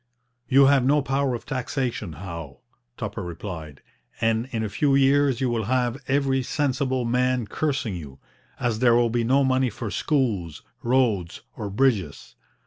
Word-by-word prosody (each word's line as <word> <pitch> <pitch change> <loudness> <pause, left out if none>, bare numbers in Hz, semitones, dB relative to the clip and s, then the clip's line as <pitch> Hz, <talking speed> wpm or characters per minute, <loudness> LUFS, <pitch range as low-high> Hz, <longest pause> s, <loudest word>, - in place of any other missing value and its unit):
'You 135 +1 +6
have 135 -1 +4
no 145 +2 +3
power 135 -2 0
of 120 - -8
taxation, 125 - -3
Howe,' 85 -4 -8 0.4
Tupper - - -4
replied, 85 -4 -7 0.4
'and 115 +2 +1
in 115 -4 -2
a - - -1
few 140 +7 +2
years 140 -1 +3
you 130 - +1
will 115 -3 -1
have 125 +2 0
every 135 -1 +1
sensible 130 -2 -1
man 125 0 +1
cursing 140 -4 -2
you, 70 -6 -9 0.4
as 115 -3 -1
there 120 -1 +5
will 120 -1 +3
be 120 0 +1
no 135 +4 +3
money 130 -1 +2
for 110 0 -6
schools, 110 - -1 0.2
roads, 115 -8 +1
or 105 - -5
bridges. 100 - 0
125 Hz, 155 wpm, -24 LUFS, 105-135 Hz, 0.4 s, You